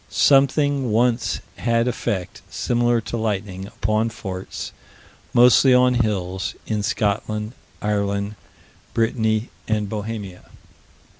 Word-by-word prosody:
Something 140 -2 +3
once 120 +2 +1 0.2
had 115 0 +1
effect, 95 -6 -3
similar 120 -1 +1
to 110 +2 -4
lightning, 100 -3 -3
upon 110 0 0
forts, 95 -4 -6 0.6
mostly 125 +1 +6
on 125 0 +5
hills, 95 -6 -1
in 110 -2 -1
Scotland, 105 0 -1 0.3
Ireland, 100 0 -1 0.6
Brittany, 110 -1 +1 0.2
and 105 -1 0
Bohemia. 105 -3 -5
110 Hz, 95 wpm, -22 LUFS, 100-120 Hz, 0.6 s, mostly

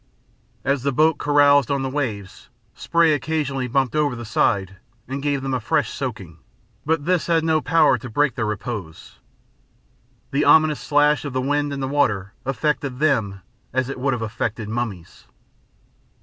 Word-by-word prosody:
As 140 -1 +1
the 140 +2 0
boat 155 +3 +2
caroused 145 -2 +4
on 140 -1 0
the - - -1
waves, 110 -9 -5 0.2
spray 170 -2 +2
occasionally 145 -3 -2
bumped 130 -1 0
over 150 -4 +1
the 120 0 -7
side 100 -3 0 0.3
and 135 +2 -4
gave 140 -2 -1
them 135 -1 -2
a 130 - 0
fresh 110 - 0
soaking, - - -6 0.5
but 160 -2 0
this 180 -2 +1
had 165 -2 +2
no 160 -1 +2
power 165 +3 +3
to 125 - -8
break 140 +3 +1
their 110 -2 -2
repose. 105 -6 -6 1.1
The 145 +1 +1
ominous 155 -2 +5
slash 150 0 +2
of 145 -3 -5
the 130 - 0
wind 145 +2 0
and 140 -1 -4
the - - -1
water 110 -9 0
affected 140 -1 -1
them 115 -10 0 0.3
as 130 0 0
it 135 - -5
would 135 +1 0
have 120 -2 -3
affected 110 0 -4
mummies. 110 -7 -5
135 Hz, 165 wpm, -22 LUFS, 120-145 Hz, 1.1 s, ominous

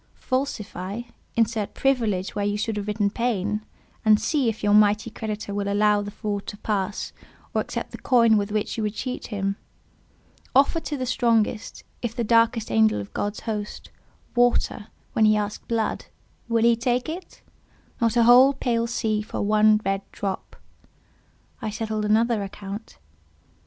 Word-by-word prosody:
Falsify: 220 -6 -3 0.3
insert 225 -2 0
"privilege" 225 -9 0
where 205 - -2
you 205 0 0
should 220 +1 -2
have 205 0 -4
written 205 -1 0
"pain;" 210 -3 -1 0.4
and 215 -2 +5
see 280 -7 +1
if 220 -1 -5
your 205 0 +3
mighty 210 +1 +4
creditor 215 -2 -5
will 200 0 -1
allow 210 0 +3
the 205 - -5
fraud 205 -1 -4
to 205 - -6
pass, 205 -2 -2 0.4
or - - +2
accept - - -5
the - - -8
coin 230 -3 +4
with 205 0 0
which 210 0 -1
you - - -1
would 210 0 -2
cheat 255 +2 -4
him. 200 -2 -2 1.0
Offer 280 +5 +4
to 300 -2 -4
the 255 - -2
strongest—if 230 -1 -1
the 235 - -1
darkest 230 - +3
angel 110 -1 +4
of 100 - -8
God's 205 +1 -3
host—water, 220 +1 -2 0.3
when 220 - +4
he 215 0 +5
has 210 - +2
asked - - -13
blood—will 230 0 -3
he 235 0 +5
take 245 +1 0
it? 340 +4 -8 0.6
Not 230 0 +2
a 235 - +6
whole 250 +4 +7
pale 235 -3 0
sea 220 -2 0
for 210 - -4
one 215 +1 +4
red 195 0 0
drop. 195 -2 -4 1.1
I 220 - -2
settled 215 0 -2
another 225 +1 +2
account. 200 - -7
215 Hz, 155 wpm, -24 LUFS, 205-235 Hz, 1.1 s, whole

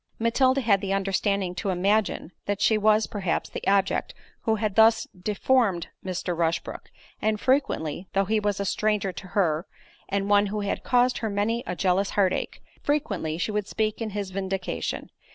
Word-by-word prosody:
Matilda 260 +4 +2
had 200 -5 +3
the 195 -1 -1
understanding 195 -1 0
to 180 +2 -3
imagine, 195 -1 +1 0.2
that 205 0 -1
she 220 - +4
was, 215 0 +4
perhaps, 195 -5 -2
the - - -6
object 195 -1 +1 0.3
who 220 - +1
had 215 -2 -1
thus 225 +1 +5
deformed 205 -1 +1
Mr. 180 -1 -3
Rushbrook, 165 0 -2 0.3
and 215 0 +1
frequently 205 - 0
(though 195 0 +2
he 215 +3 +1
was 205 -1 -1
a 200 - -1
stranger 210 -1 0
to 190 - -8
her, 170 -2 +1 0.4
and 200 0 0
one 205 0 +4
who 210 +1 -3
had 200 - -2
caused 250 0 +2
her 220 - -2
many 215 +4 0
a 180 - -2
jealous 190 +2 +1
heart 190 -2 +4
ache) - - -4 0.2
frequently 200 - -1
she 175 - -1
would 210 -1 -2
speak 215 +1 -1
in 225 - -2
his 200 -2 -4
vindication. 190 0 -3
200 Hz, 175 wpm, -26 LUFS, 190-220 Hz, 0.4 s, thus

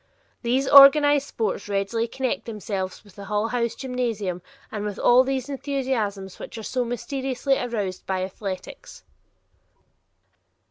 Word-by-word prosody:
These 260 +3 +1
organized 285 0 +8
sports 210 -2 -3
readily 200 +4 -1
connect 260 +2 -3
themselves 200 -4 -5
with 205 -3 -18
the 200 - -9
Hull 210 +2 -1
House 235 -1 -1
gymnasium 230 -9 -3 0.3
and 210 -2 -4
with 210 -1 -4
all 250 +1 +5
those 265 -1 -2
enthusiasms 255 -9 -3
which - - -8
are 220 - -7
so 250 +3 -1
mysteriously 265 +2 -2
aroused 205 -6 -4
by 185 -1 -1
athletics. 190 0 -7
230 Hz, 130 wpm, -24 LUFS, 200-265 Hz, 0.3 s, organized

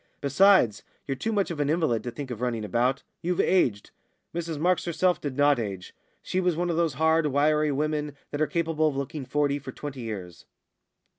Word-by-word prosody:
Besides, 145 - +4 0.2
you're 135 - -2
too 220 +12 -3
much 200 -4 0
of 160 - -5
an 145 -1 +1
invalid 150 -9 +1
to - - -2
think 130 +2 -7
of 120 -1 -6
running 115 -3 -1
about. 125 +6 0 0.2
You've 180 +1 -1
aged." 125 - +2 0.4
Mrs 165 -2 -3
Marks 180 +4 +1
herself 180 +1 +1
did 140 -3 -4
not 145 -2 +4
age; 100 -5 -5 0.3
she 185 - -1
was 180 -2 +1
one 175 +1 0
of - - -1
those 165 -4 +1
hard, 160 +2 +3
wiry 150 +2 +2
women 150 0 -2
that 145 - -3
are 155 - +3
capable 165 -2 0
of 140 -3 -2
looking 140 +1 -4
forty 145 +1 0
for 135 -1 -8
twenty 140 -1 -7
years. 95 -7 -7
145 Hz, 200 wpm, -26 LUFS, 130-165 Hz, 0.4 s, Besides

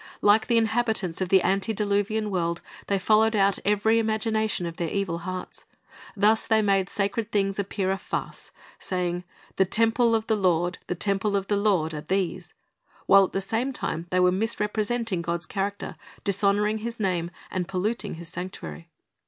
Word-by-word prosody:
Like 210 +2 +5
the 235 - +3
inhabitants 220 -6 0
of 185 - -1
the 190 -1 +5
antediluvian 205 +1 0
world, 170 -2 -1 0.3
they 200 - +2
followed 220 +3 +3
out 200 -1 +3
eveiy 210 +2 +3
imagination 220 -3 0
of 170 -1 -6
their 170 -2 -2
evil 190 -3 -2
hearts. 185 0 -6 0.5
Thus 215 +3 +3
they 220 -1 +3
made 195 -2 +2
sacred 210 +2 -1
things 195 -2 0
appear 195 -1 -1
a 195 - -1
farce, - - -4 0.3
saying, 180 -1 -2 0.3
"The 190 - +4
temple 230 +3 +3
of 220 -1 0
the 220 - +2
Lord, 180 -3 +1
the 180 - -2
temple 200 +2 0
of 195 -1 0
the 205 - +3
Lord, 195 -6 +1
are 150 - -4
these,"' 180 +1 -2 0.5
while 195 0 +7
at - - -9
the 195 - 0
same 225 +7 -1
time 165 -7 -3
they 185 - +1
were 180 0 +5
misrepresenting 215 0 -1
God's 170 0 -2
character, 200 +3 -3 0.3
dishonoring 205 +2 +1
His 230 +1 -5
name, 180 -4 0 0.2
and 180 -2 -2
polluting 195 +3 -2
His 170 +1 -8
sanctuary. 165 - -7
200 Hz, 170 wpm, -26 LUFS, 180-215 Hz, 0.5 s, while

